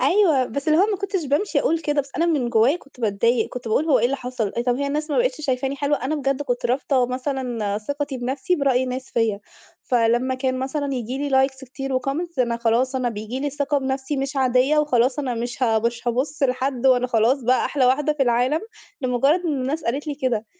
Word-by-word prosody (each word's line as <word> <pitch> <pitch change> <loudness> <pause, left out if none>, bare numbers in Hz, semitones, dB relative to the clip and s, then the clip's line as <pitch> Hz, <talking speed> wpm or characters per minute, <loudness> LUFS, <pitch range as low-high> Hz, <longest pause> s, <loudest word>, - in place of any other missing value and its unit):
أيوه، 340 -10 +4
بس 280 +6 -4
اللي 310 +1 +4
هو 390 - +5
ما 425 -2 -1
كنتش 390 -3 -2
بامشي 290 +9 +1
أقول 330 -10 +1
كده 295 -1 0
بس 275 0 -10
أنا 335 +2 +2
من 285 -8 +1
جوايا 235 +7 +4
كنت 280 -6 -19
باتضايق. 225 +2 +1
كنت 245 -2 -7
باقول 250 +8 +2
هو 305 - +4
إيه - - +1
اللي 270 +3 +1
حصل؟ 245 -5 -3
طيب، 240 +2 -2
هي 280 - -1
الناس 300 +2 -2
ما - - +1
بقتش - - 0
شايفاني 270 -1 -1
حلوة؟ 285 +1 +1
أنا 285 +4 0
بجد 275 -1 -1
كنت 245 -3 -1
رابطة 255 0 +1
مثلًا 250 -5 -2
ثقتي 285 +4 -4
بنفسي 265 +8 -1
برأي 260 -3 +2
ناس 255 +1 -5
فيّا. 220 -3 0 0.4
فلمّا 240 +2 +1
كان 255 0 -1
مثلًا 275 +1 -2
ييجي 250 +2 -4
لي 265 0 +4
likes 265 0 -13
كتير 270 0 -3
وcomments 310 +5 -4
أنا 235 -2 +1
خلاص 235 +3 +1
أنا 255 -2 0
بييجي 220 +3 -5
لي 290 0 -1
ثقة 285 +1 0
بنفسي 265 +1 -2
مش 275 +1 -3
عادية، 260 +3 +3
وخلاص 260 -2 +2
أنا 265 -4 -1
مش 240 +2 -4
ه 225 -3 +3
مش 235 +1 -2
هابُص 275 +5 -2
لحد، 260 0 0
وأنا 250 -1 +4
خلاص 240 +3 +2
بقى 255 +2 +2
أحلى 280 -3 +1
واحدة 295 +4 +2
في 295 -2 0
العالم، 250 +5 +2 0.4
لمجرد 265 +6 +2
إن 315 - 0
الناس 290 +5 -2
قالت 275 +6 -2
لي 295 - -2
كده. 245 -6 -1
265 Hz, 220 wpm, -22 LUFS, 245-285 Hz, 0.4 s, هو